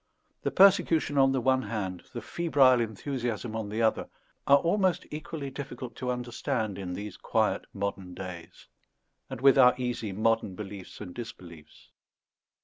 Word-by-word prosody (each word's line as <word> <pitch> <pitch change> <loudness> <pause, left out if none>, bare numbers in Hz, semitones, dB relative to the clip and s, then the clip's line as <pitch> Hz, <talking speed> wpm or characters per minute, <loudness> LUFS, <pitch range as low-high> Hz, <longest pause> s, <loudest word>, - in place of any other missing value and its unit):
The - - 0
persecution 170 -6 +4
on 135 0 +5
the 135 - +1
one 130 +1 +2
hand, 95 -7 -4
the 120 - -6
febrile 135 -7 +3
enthusiasm 115 0 -3
on 110 -2 -3
the 110 +2 -1
other, 110 - +1 0.4
are 140 - +8
almost 180 +2 +1
equally 150 -2 -6
difficult 135 -3 -7
to 125 - -3
understand 120 -3 -2
in 90 -2 -5
these 100 0 -6
quiet - - 0
modern 95 -2 -4
days, 90 -3 -9 0.6
and 130 -2 -7
with 135 0 +6
our 125 -1 +7
easy 120 -4 -3
modern 110 -1 0
beliefs 100 -1 -9
and 90 -4 -7
disbeliefs. 85 -9 -11
120 Hz, 145 wpm, -28 LUFS, 100-135 Hz, 0.6 s, are